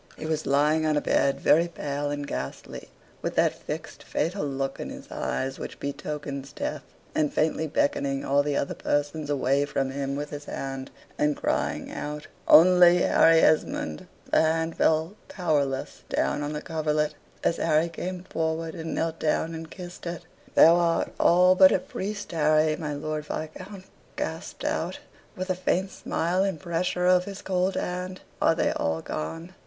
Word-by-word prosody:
He - - -6
was 155 -1 -2
lying 150 +3 +3
on 155 -1 +2
a - - +4
bed, 140 -1 +1
very 165 +4 +4
pale 145 -3 -3
and 145 0 -3
ghastly, 65 - -6 0.3
with - - -3
that - - +3
fixed, - - -7
fatal 170 +5 -2
look 135 -1 -3
in - - -5
his - - -10
eyes, 135 +1 -3
which - - -7
betokens 140 -1 -5
death; 150 0 -4 0.3
and 150 -2 +1
faintly 160 0 0
beckoning 140 -2 0
all 140 +1 +3
the 145 0 -1
other - - -1
persons 145 +1 -1
away 140 0 +2
from 135 -2 -1
him 140 0 -3
with 145 +1 -4
his 145 0 -7
hand, 135 -1 -5 0.3
and 150 0 +2
crying - - -1
out 150 0 -5 0.2
"Only 180 +1 +7
Harry 165 0 +5
Esmond," 115 - +1 0.2
the - - +5
hand 160 +1 +1
fell 160 +3 +2
powerless 145 -7 -1
down - - 0
on 145 +1 -3
the 150 - -5
coverlet, 150 -1 0 0.3
as 170 - +2
Harry 160 +1 +2
came 180 +2 -5
forward, 160 -2 -2
and 160 0 -5
knelt 165 0 -2
down 160 +1 0
and 160 0 -7
kissed 175 -1 -9
it. 170 -1 -5 0.3
"Thou 165 +2 +8
art 170 -1 +1
all 180 +2 +6
but 185 0 +7
a - - +4
priest, 205 +3 -5
Harry," 155 -1 +3
my 150 -2 -4
Lord 155 +1 -4
Viscount 185 +6 -6 0.3
gasped - - -5
out, - - -1 0.4
with 185 +1 -3
a - - 0
faint 185 +1 0
smile, 175 +3 -1
and 195 -5 -1
pressure 180 0 -1
of 180 0 +4
his 200 -1 -8
cold 185 0 0
hand. 180 +1 -3 0.2
"Are - - +4
they - - +1
all 80 0 -1
gone? 165 - -5
155 Hz, 170 wpm, -26 LUFS, 145-175 Hz, 0.4 s, Thou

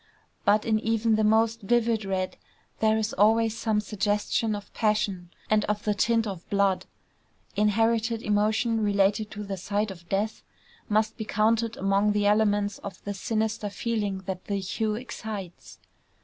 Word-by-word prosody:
But 210 +1 +4
in 220 -1 +2
even 225 0 +1
the 215 0 +2
most 225 +1 +3
vivid 225 0 +1
red 190 -1 -2 0.4
there 220 0 +3
is 220 0 -1
always 220 +2 +3
some 220 -2 0
suggestion 210 +1 0
of 205 0 -9
passion, 210 -5 0 0.2
and 215 -1 +3
of 210 0 -2
the 210 - +1
tint 230 +2 +2
of 190 -5 -6
blood. 200 -2 +1 0.7
Inherited 225 +2 +1
emotion 215 +2 +1
related 205 +1 +2
to 210 0 -6
the 195 -1 -5
sight 205 +3 -1
of 170 -2 -13
death 205 +3 -1 0.5
must 215 +1 +1
be 220 - -3
counted 225 +2 +1
among 195 +2 +2
the 205 0 +1
elements 205 -1 +2
of 195 -2 -9
the 205 - -3
sinister 220 +1 -2
feeling 205 -3 -2
that 185 -1 -5
the 200 - -2
hue 210 +3 -2
excites. 215 -6 -7
210 Hz, 155 wpm, -27 LUFS, 200-220 Hz, 0.7 s, But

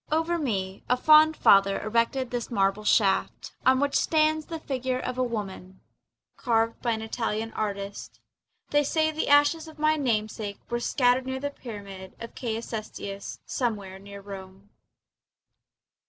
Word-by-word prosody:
Over 325 +2 +1
me 195 -9 -2
a 250 - +3
fond 310 +3 +6
father 195 0 +5
erected 235 +3 0
this 245 -2 -3
marble 195 -1 +1
shaft, 200 -3 +2 0.2
On 260 0 +5
which 285 0 0
stands 310 -1 +2
the 330 -2 -5
figure 260 -3 -2
of 255 0 -4
a - - +3
woman 195 -5 -5 0.6
Carved 230 -1 0
by 235 -2 +1
an 220 0 -4
Italian 225 -1 -3
artist. 200 -1 -5 0.5
They 290 0 +4
say 315 +2 +1
the 315 +1 -2
ashes 290 +3 +4
of 315 -1 -12
my 310 +1 +2
namesake 215 -5 -1
Were 240 - 0
scattered 250 +1 +2
near 260 0 -3
the 285 +1 -3
pyramid 200 -7 -9
of 230 - -8
Caius 230 -2 -4
Cestius 200 -3 -6
Somewhere 200 -6 -3
near 200 0 -10
Rome. 195 0 -11
230 Hz, 150 wpm, -27 LUFS, 200-280 Hz, 0.6 s, fond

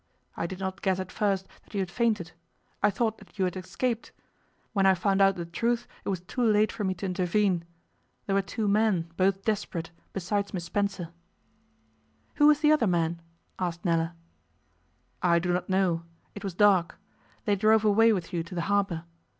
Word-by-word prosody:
I 170 - -2
did 185 - -6
not 190 -2 -4
guess 190 -1 +1
at 185 -1 -5
first 195 -3 0 0.2
that - - -14
you - - 0
had 185 -2 -2
fainted. 210 -7 0 0.5
I 205 - +5
thought 220 +2 -1
that 205 0 -18
you 190 - +2
had 180 - -2
escaped. 225 +6 -3 0.6
When 195 -2 +3
I 190 - +6
found 195 +2 +1
out 195 0 +5
the 170 - -4
truth 235 +8 -1 0.2
it - - -3
was 185 -3 -1
too 185 +7 -5
late 215 -2 +4
for 210 - -4
me 190 -1 0
to 185 - -5
intervene. 185 -1 +1 0.6
There 195 - -1
were 195 - +3
two 210 +2 -3
men, 200 -5 +2
both 195 +1 +1
desperate, 195 -6 -2 0.2
besides 200 +2 -2
Miss 175 - -3
Spencer 195 -1 -2 0.6
' - - -40
'Who 295 - +6
was 300 -1 +5
the 300 -1 +5
other 300 -8 +4
man?' 170 -1 0 0.4
asked 175 -1 -3
Nella. 165 -1 +1 1.1
'I 170 -1 +4
do 175 +1 0
not 180 +1 -2
know. 185 -3 +2 0.3
It 205 - -9
was 195 -3 -4
dark. 190 -4 +4 0.5
They 205 - +3
drove 215 +2 +4
away 225 +2 +5
with 185 -3 -2
you 170 - 0
to 170 +2 -8
the 170 - -1
harbour. 195 -2 0
195 Hz, 190 wpm, -28 LUFS, 175-210 Hz, 1.1 s, I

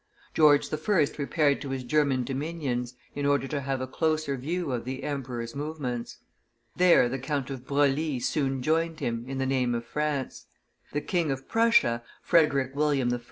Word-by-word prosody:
George 150 -2 +4
I. 155 +7 +1 0.2
repaired 145 0 +1
to 140 - -5
his 135 -1 -3
German 135 -1 +2
dominions, 135 -3 -3 0.2
in 145 0 -1
order 140 -1 +2
to 145 0 -2
have 135 -1 -2
a - - -1
closer 155 0 0
view 160 +4 -3
of 120 -2 -2
the 130 +2 -5
emperor's 125 -4 -4
movements. 140 -5 -4 0.6
There 175 -8 +5
the 135 +2 -3
Count 140 0 -2
of 130 -1 -7
Broglie 145 0 +1
soon 135 0 -1
joined 165 +2 +1
him, 115 0 -2
in 135 0 -4
the 135 - 0
name 130 -2 +1
of 115 0 -4
France. 150 0 -3 0.4
The 145 - -1
King 170 -3 0
of 135 0 -3
Prussia, 225 - +3 0.2
Frederick 140 -5 +3
William 140 -4 +1
I. 120 - -2
140 Hz, 170 wpm, -27 LUFS, 130-150 Hz, 0.6 s, There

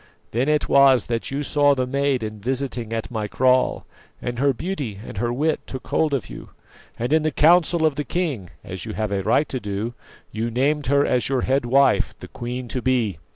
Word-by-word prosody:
Then 125 +6 0
it 150 -1 +1
was 135 -4 +5
that 115 -1 -2
you 140 +2 -2
saw 145 0 +3
the 130 -1 0
maid 140 -1 0
in 110 -1 -5
visiting 125 0 -3
at 115 +1 -3
my 110 -3 -2
kraal, 130 +3 +2 0.3
and 120 -1 -4
her 140 +1 +3
beauty 135 - -4
and 100 - -6
her 120 +1 0
wit 150 +5 0
took 130 - -8
hold 155 -2 +1
of 130 - -3
you; - - -10 0.5
and 120 +5 -1
in 160 - +4
the 155 - +1
council 165 +2 +4
of 155 -3 +1
the 150 - -1
king, 145 - -2
as 95 -2 -7
you 110 - -6
have 110 -1 -2
a 100 -1 0
right 145 +9 +2
to 130 - -3
do, 105 +2 -4 0.4
you 110 +2 -2
named 140 +4 0
her 140 +1 +3
as 125 0 +1
your 135 -2 +1
head 135 -1 +1
wife, 135 +3 +3
the - - -9
queen 125 +1 -6
to 125 +4 -3
be. 120 -9 0
130 Hz, 215 wpm, -22 LUFS, 115-140 Hz, 0.5 s, was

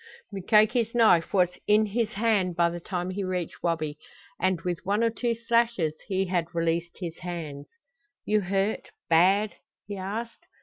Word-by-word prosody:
Mukoki's 215 +4 +2
knife 195 -8 +4
was 180 -3 +3 0.2
in 210 +1 +5
his 215 +1 -1
hand 200 -4 +1
by 170 0 +3
the 175 - -5
time 180 +1 -3
he 195 +2 -3
reached 180 -3 -4
Wabi, 155 -3 -2 0.4
and 185 -2 +1
with 175 -2 -3
one 205 +4 +1
or 230 - +2
two 235 +1 -1
slashes 230 -8 +1
he 190 0 0
had 175 -2 -2
released 170 0 -1
his 170 -3 -6
hands. 160 -5 -6 0.6
"You 215 0 +2
hurt 195 +3 -1 0.2
bad?" 195 +6 +4 0.3
he 205 -1 -6
asked. 215 +5 -6
190 Hz, 160 wpm, -27 LUFS, 170-215 Hz, 0.6 s, in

